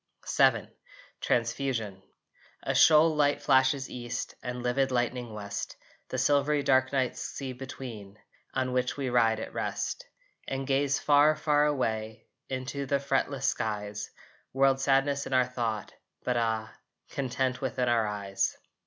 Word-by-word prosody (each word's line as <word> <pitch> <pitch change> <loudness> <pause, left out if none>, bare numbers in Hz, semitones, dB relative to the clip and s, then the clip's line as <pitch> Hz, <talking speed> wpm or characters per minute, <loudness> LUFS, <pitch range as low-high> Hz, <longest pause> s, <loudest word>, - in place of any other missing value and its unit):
VII - - +4 0.5
TRANSFUSION 115 -4 -1 0.6
A - - -1
shoal 155 0 +6
light 145 -1 +2
flashes 135 0 +3
east, 120 0 -5
And 125 0 -5
livid 130 +2 +1
lightning 120 -1 -1
west, 100 -1 -5 0.3
The 130 - -3
silvery 145 +2 +2
dark 130 -1 +3
night 130 -3 0
sea 135 -2 -5
between, 120 -6 -8 0.4
On 130 -1 0
which 125 +1 0
we 135 -3 -2
ride 115 -2 +3
at - - -6
rest, - - -3 0.4
And 135 0 -3
gaze 135 0 +1
far, 150 +2 +4
far 150 -1 +2
away 110 -6 -2 0.2
Into 135 +2 -4
the 140 - +2
fretless 140 0 -1
skies, 105 -1 -2 0.4
World 135 0 +3
sadness 140 +1 +2
in - - -5
our 130 -1 +4
thought 115 -4 -3 0.3
but 125 - 0
ah, 110 -2 -1 0.4
Content 130 -1 -1
within 130 -1 -1
our 115 -2 +2
eyes. 100 -2 -2
130 Hz, 135 wpm, -29 LUFS, 115-140 Hz, 0.6 s, shoal